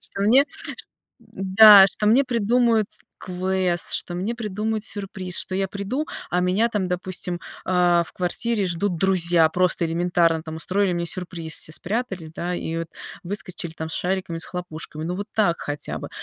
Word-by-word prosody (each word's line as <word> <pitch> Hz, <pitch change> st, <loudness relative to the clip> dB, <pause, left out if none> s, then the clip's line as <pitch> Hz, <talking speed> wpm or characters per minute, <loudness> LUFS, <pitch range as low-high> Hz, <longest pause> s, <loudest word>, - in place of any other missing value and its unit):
Что -, -, -9 dB
мне 245 Hz, +7 st, +5 dB
чт -, -, -11 dB, 0.6 s
да, 195 Hz, +1 st, +7 dB
что 210 Hz, -, -3 dB
мне 235 Hz, +6 st, +5 dB
придумают 235 Hz, -2 st, +2 dB, 0.3 s
квест, 185 Hz, -1 st, -1 dB
что 175 Hz, -, -2 dB
мне 195 Hz, +7 st, -2 dB
придумают 215 Hz, 0 st, -3 dB
сюрприз. 190 Hz, -4 st, -3 dB
Что 185 Hz, -, -4 dB
я 195 Hz, 0 st, 0 dB
приду, 205 Hz, +10 st, -3 dB, 0.2 s
а 180 Hz, -, +1 dB
меня 185 Hz, +6 st, +2 dB
там, 205 Hz, -5 st, -1 dB
допустим, 180 Hz, -1 st, -3 dB, 0.2 s
а 175 Hz, -2 st, +3 dB
в -, -, -14 dB
квартире 200 Hz, +4 st, -1 dB
ждут 175 Hz, +1 st, -1 dB
друзья, 175 Hz, -2 st, +4 dB
просто 180 Hz, +1 st, +1 dB
элементарно 170 Hz, -1 st, +1 dB
там 160 Hz, -1 st, -7 dB
устроили 190 Hz, +3 st, 0 dB
мне 170 Hz, 0 st, -2 dB
сюрприз, 170 Hz, -3 st, -3 dB
все 155 Hz, -, -1 dB
спрятались, 190 Hz, -2 st, -4 dB
да, 175 Hz, +2 st, -3 dB
и 165 Hz, -1 st, -4 dB
вот 165 Hz, -1 st, -5 dB, 0.4 s
выскочили 185 Hz, -3 st, -3 dB
там 160 Hz, 0 st, -6 dB
с -, -, -2 dB
шариками, 185 Hz, -2 st, -2 dB
с 165 Hz, -, +1 dB
хлопушками. 160 Hz, -3 st, -7 dB
Ну 175 Hz, +2 st, -3 dB
вот 200 Hz, +1 st, -4 dB
так 200 Hz, -6 st, +2 dB
хотя 145 Hz, 0 st, -4 dB
бы. -, -, -7 dB
185 Hz, 170 wpm, -23 LUFS, 170-205 Hz, 0.6 s, да